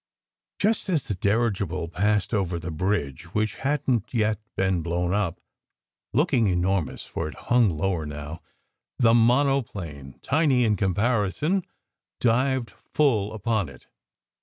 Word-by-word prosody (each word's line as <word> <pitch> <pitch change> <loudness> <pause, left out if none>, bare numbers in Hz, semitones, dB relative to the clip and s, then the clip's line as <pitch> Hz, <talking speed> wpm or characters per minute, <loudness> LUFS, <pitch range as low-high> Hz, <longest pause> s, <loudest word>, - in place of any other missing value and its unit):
Just 210 0 0
as 160 -7 +1
the - - -3
dirigible 100 -2 0
passed 105 +5 0
over 95 -5 0
the 85 0 -5
bridge, 85 -2 -2
which 110 0 0
hadn 135 -3 +1
t 120 +3 -6
yet 110 -1 +1 0.2
been 95 -2 +1
blown 85 +2 -1
up, 100 -4 -1 0.7
looking 130 - +2
enormous, 90 -3 0
for - - -4
it 75 - -8
hung 120 - +3
lower 80 -1 -1
now, 75 +2 -7 0.6
the 115 -3 +5
monoplane 115 - +1
tiny 140 -4 +3
in 105 -2 +3
comparison 105 - +1 0.6
dived 125 +1 +1
full 110 -9 0
upon 110 - -1
it. 65 -2 -15
105 Hz, 130 wpm, -25 LUFS, 90-120 Hz, 0.7 s, the